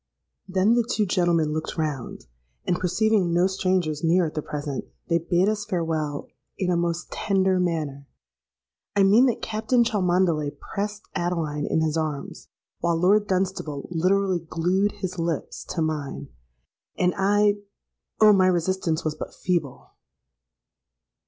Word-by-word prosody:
Then 190 +4 +3
the 240 0 +3
two 220 -2 0
gentlemen 175 -5 +1
looked 155 +2 -4
round, 150 -6 -3 0.4
and, 175 - 0
perceiving 195 0 +2
no 175 +2 +3
strangers 185 -5 0
near 170 +2 +3
at 155 - -4
the 155 - -2
present, 145 -2 -4 0.2
they 170 0 +3
bade 175 +3 +1
us 210 0 0
farewell 160 -6 -2 0.3
in 180 -2 0
a - - +2
most 170 0 -2
tender 190 -2 +1
manner:—I 140 - -4
mean 215 +7 +6
that 240 - -1
Captain 225 +3 +1
Cholmondeley 180 -8 +1 0.2
pressed 205 0 -3
Adeline 160 -4 -2
in 160 - +1
his 160 0 0
arms, 155 -3 -4 0.3
while 170 -1 +1
Lord 200 +5 +3
Dunstable 185 -7 -2
literally 185 +2 +2
glued 180 +5 0
his 185 -1 -5
lips 165 -3 -3
to 165 - -2
mine. 155 -3 -3 0.7
And 180 0 +2
I——Oh! 205 +1 +1
my 190 -2 +4
resistance 175 -2 0
was 155 - 0
but 155 - -8
feeble! 170 -8 -2
175 Hz, 135 wpm, -25 LUFS, 155-195 Hz, 0.7 s, mean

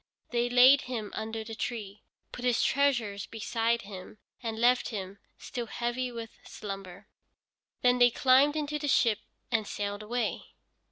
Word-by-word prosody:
They 240 0 +1
laid 255 +3 +7
him 220 -5 -4
under 220 0 -4
the 225 +1 -8
tree, 215 -3 -5 0.3
put 245 - -8
his 245 -2 +2
treasures 240 -8 +1
beside 230 +1 -1
him, 195 0 -10 0.2
and 225 -2 -4
left 245 +2 +3
him, 200 -2 -6 0.2
still 240 -3 -5
heavy 240 +2 -2
with 230 -2 -8
slumber. 195 -3 -8 0.8
Then 250 0 +4
they 245 0 +7
climbed 265 +4 +4
into 300 -1 -2
their 290 -1 -2
ship 230 -5 +3 0.3
and 220 -3 +1
sailed 205 0 -3
away. 235 +3 -3
235 Hz, 150 wpm, -29 LUFS, 210-250 Hz, 0.8 s, laid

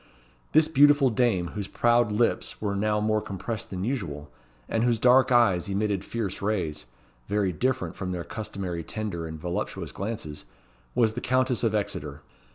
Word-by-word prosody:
This 155 0 +6
beautiful 145 -2 +5
dame, 105 -7 +1
whose 100 -2 -5
proud 120 -2 +3
lips 115 +3 0
were 100 -2 -1
now 105 +1 +1
more 110 0 +1
compressed 105 +3 -5
than 95 -1 -4
usual, 85 - -3 0.4
and 115 - 0
whose 120 -1 +3
dark 125 +3 +5
eyes 100 -7 +4
emitted 100 -1 0
fierce 105 -3 -4
rays 90 - -2 0.4
very 100 -2 +1
different 130 +8 -1
from 95 -2 -4
their 90 -2 -3
customary 95 -6 -5
tender 100 -6 -4
and 80 -1 -7
voluptuous 85 +2 -4
glances 100 -8 -5 0.5
was 115 -3 +3
the 125 - -4
Countess 130 0 +1
of 110 -2 +2
Exeter. 105 -1 -3
105 Hz, 160 wpm, -27 LUFS, 95-120 Hz, 0.5 s, This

